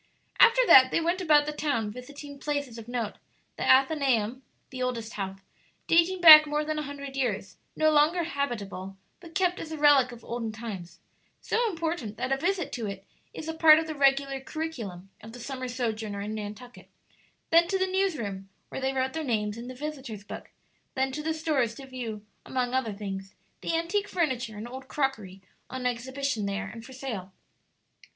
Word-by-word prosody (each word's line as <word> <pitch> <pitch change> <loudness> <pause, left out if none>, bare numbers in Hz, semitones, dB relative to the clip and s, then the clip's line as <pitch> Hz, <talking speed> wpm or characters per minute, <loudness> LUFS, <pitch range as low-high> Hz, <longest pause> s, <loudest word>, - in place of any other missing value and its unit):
After 475 +1 +7
that 260 - +8
they - - +1
went 345 +3 0
about 300 -4 +5
the 300 - -2
town 280 -8 -1
visiting 280 +4 -10
places 285 -6 -3
of 225 - -11
note 240 -3 -3 0.4
the - - -4
Athenaeum, 260 -4 +3 0.3
the 260 -1 -6
oldest 235 -3 -3
house, 195 -1 -5 0.4
dating 345 +2 +3
back 310 -2 +11
more 300 +1 -1
than 310 0 -2
a 300 -2 -5
hundred 280 -1 -7
years, 215 -7 -2 0.2
no 310 0 +3
longer 310 +4 +3
habitable, 210 - -4 0.2
but 340 -2 -14
kept 365 -2 +1
as 320 - -7
a 315 - -4
relic 285 -4 +5
of 240 -1 -12
olden 230 -2 -3
times, 200 -6 -8 0.4
so 470 0 0
important 325 - -3
that 260 - -2
a 270 - +2
visit 355 +2 -1
to 230 -3 -4
it 195 -1 -7 0.3
is 315 - -8
a 320 - -2
part 320 -1 +7
of 320 - 0
the 315 - -4
regular 275 -1 +2
curriculum 230 - -6
of 220 +1 -11
the 245 - -9
summer 255 +1 -5
sojourner 220 -4 -3
in 210 +2 -4
Nantucket; 215 +3 -8 0.6
then 335 +1 +6
to 385 - 0
the 375 - +1
news 380 -2 0
room, 195 -4 -5 0.2
where - - -6
they 265 0 0
wrote 260 0 -1
their 320 0 -3
names 210 -6 -1
in 235 +2 -8
the 255 - -7
"Visitors' 265 -7 -6
Book;" - - -9 0.5
then 265 0 0
to 295 +3 -4
the 320 +1 -1
stores 300 -8 0
to 270 - -10
view, 235 -5 -6 0.2
among 250 -1 -2
other 260 -4 0
things, 195 -1 -6 0.3
the 330 - 0
antique 395 +5 -1
furniture 255 -11 -1
and 215 +3 -6
old 260 +2 -9
crockery 220 -10 -3 0.3
on 260 -1 -5
exhibition 250 -2 -2
there 200 +1 -2
and 230 -1 -9
for 260 - -12
sale. 220 -8 -6
260 Hz, 190 wpm, -28 LUFS, 220-305 Hz, 0.6 s, back